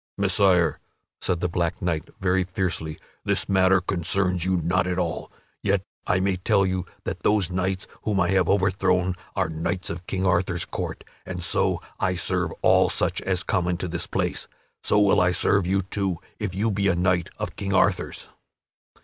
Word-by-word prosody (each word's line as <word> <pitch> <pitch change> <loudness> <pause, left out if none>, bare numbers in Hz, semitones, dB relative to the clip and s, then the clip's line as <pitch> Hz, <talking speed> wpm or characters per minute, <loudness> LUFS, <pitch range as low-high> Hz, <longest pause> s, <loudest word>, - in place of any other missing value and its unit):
"Messire," 95 -4 +3 0.4
said 85 -2 0
the 90 - +1
black 85 -1 -1
knight 80 -4 -2
very 95 0 +2
fiercely, 90 -4 -3 0.3
"this - - 0
matter 95 -1 +4
concerns 90 0 0
you 95 0 +2
not 85 +2 +1
at 90 0 -1
all; 85 -3 -2 0.3
yet 100 -1 +1 0.2
I 90 - +3
may 95 0 +1
tell 100 +1 +2
you 95 -1 -2 0.2
that - - -4
those 100 -4 +2
knights 95 +1 -1 0.2
whom 105 -3 0
I 85 -2 +2
have 95 -3 +2
overthrown 95 -2 +2 0.2
are 95 -3 +1
knights 80 +4 -3
of 85 +1 -7
King 95 0 -1
Arthur's 90 -1 +1
court, - - -5 0.2
and 90 -2 -5
so 85 - +1 0.2
I 90 - +1
serve - - 0
all - - +5
such - - 0
as 95 -1 0
come 90 -2 0
into 90 0 -1
this 85 -1 -3
place. - - -2 0.3
So - - +2
will 100 -3 +5
I 90 - +4
serve 90 +1 +2
you, 95 +1 +1
too, 95 -2 -1 0.2
if 105 -4 -3
you 110 +3 +1
be 100 0 +1
a 95 - +3
knight 90 -1 +1
of - - -4
King 100 -1 -3
Arthur's." - - +1
90 Hz, 180 wpm, -25 LUFS, 90-95 Hz, 0.4 s, all